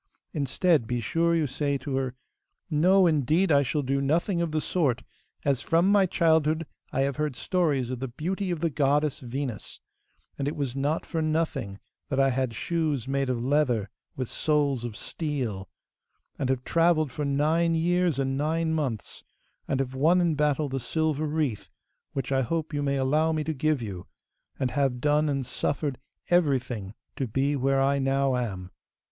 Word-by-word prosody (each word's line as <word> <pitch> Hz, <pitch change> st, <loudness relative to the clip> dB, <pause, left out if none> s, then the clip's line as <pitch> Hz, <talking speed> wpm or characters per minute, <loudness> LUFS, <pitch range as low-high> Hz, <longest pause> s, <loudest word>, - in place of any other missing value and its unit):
Instead, 145 Hz, -1 st, +1 dB
be 120 Hz, +1 st, -1 dB
sure 165 Hz, +8 st, +1 dB
you 160 Hz, -2 st, +2 dB
say 140 Hz, +1 st, -1 dB
to 135 Hz, 0 st, -4 dB
her, 130 Hz, -1 st, -2 dB, 0.6 s
"No, 185 Hz, +5 st, +5 dB
indeed 160 Hz, +3 st, +2 dB
I 140 Hz, -1 st, +6 dB
shall 145 Hz, +2 st, -1 dB
do 135 Hz, +1 st, 0 dB
nothing 170 Hz, +6 st, +1 dB
of 170 Hz, -2 st, -1 dB
the 155 Hz, -, +1 dB
sort, 140 Hz, -5 st, 0 dB, 0.4 s
as 135 Hz, -3 st, +2 dB
from 170 Hz, +6 st, +3 dB
my 200 Hz, -2 st, +5 dB
childhood 160 Hz, -1 st, +2 dB, 0.3 s
I 135 Hz, -, 0 dB
have 140 Hz, 0 st, 0 dB
heard 150 Hz, -3 st, -1 dB
stories 140 Hz, -4 st, 0 dB
of 130 Hz, -, -4 dB
the 135 Hz, -, -3 dB
beauty 185 Hz, -, -3 dB
of 170 Hz, -3 st, -2 dB
the 165 Hz, -2 st, +1 dB
goddess 145 Hz, 0 st, +1 dB
Venus, 125 Hz, -3 st, -5 dB, 0.6 s
and 140 Hz, -, -1 dB
it 145 Hz, -, -2 dB
was 135 Hz, -3 st, -3 dB
not 145 Hz, +4 st, -1 dB
for 165 Hz, -, -2 dB
nothing 155 Hz, -10 st, -1 dB, 0.3 s
that 135 Hz, -, 0 dB
I 135 Hz, 0 st, +4 dB
had 130 Hz, -2 st, -1 dB
shoes 155 Hz, -4 st, -1 dB
made 135 Hz, -1 st, 0 dB
of 120 Hz, -1 st, -1 dB
leather 130 Hz, -7 st, +1 dB, 0.2 s
with 130 Hz, -2 st, -3 dB
soles 145 Hz, -4 st, 0 dB
of 115 Hz, -4 st, -5 dB
steel, 125 Hz, -, -4 dB, 0.7 s
and 135 Hz, -3 st, -1 dB
have 130 Hz, -1 st, 0 dB
travelled 165 Hz, -3 st, +2 dB
for 150 Hz, -, -4 dB
nine 155 Hz, +4 st, +2 dB
years 175 Hz, -1 st, +2 dB
and 135 Hz, -1 st, 0 dB
nine 160 Hz, +3 st, 0 dB
months, 135 Hz, -9 st, -3 dB, 0.4 s
and 135 Hz, -, 0 dB
have 130 Hz, -1 st, -2 dB
won 160 Hz, +7 st, +4 dB
in 170 Hz, -2 st, +2 dB
battle 150 Hz, 0 st, +1 dB
the 135 Hz, 0 st, -3 dB
silver 155 Hz, +4 st, -1 dB
wreath, 150 Hz, -8 st, -2 dB, 0.4 s
which 135 Hz, -1 st, -3 dB
I 135 Hz, -1 st, +3 dB
hope 160 Hz, +4 st, -2 dB
you 145 Hz, -, -1 dB
may 140 Hz, -1 st, 0 dB
allow 150 Hz, +4 st, +2 dB
me 155 Hz, -1 st, -1 dB
to 160 Hz, -, -2 dB
give 150 Hz, -2 st, 0 dB
you, 95 Hz, -4 st, -6 dB, 0.5 s
and 130 Hz, -3 st, 0 dB
have 135 Hz, -3 st, 0 dB
done 150 Hz, +2 st, +2 dB
and 135 Hz, -2 st, -1 dB
suffered 140 Hz, +2 st, -2 dB, 0.3 s
everything 130 Hz, -, +1 dB, 0.2 s
to 135 Hz, -, -1 dB
be 135 Hz, +6 st, 0 dB
where 135 Hz, 0 st, +2 dB
I 140 Hz, +1 st, +2 dB
now 135 Hz, 0 st, +1 dB
am." 95 Hz, -7 st, -3 dB
140 Hz, 180 wpm, -27 LUFS, 130-160 Hz, 0.7 s, I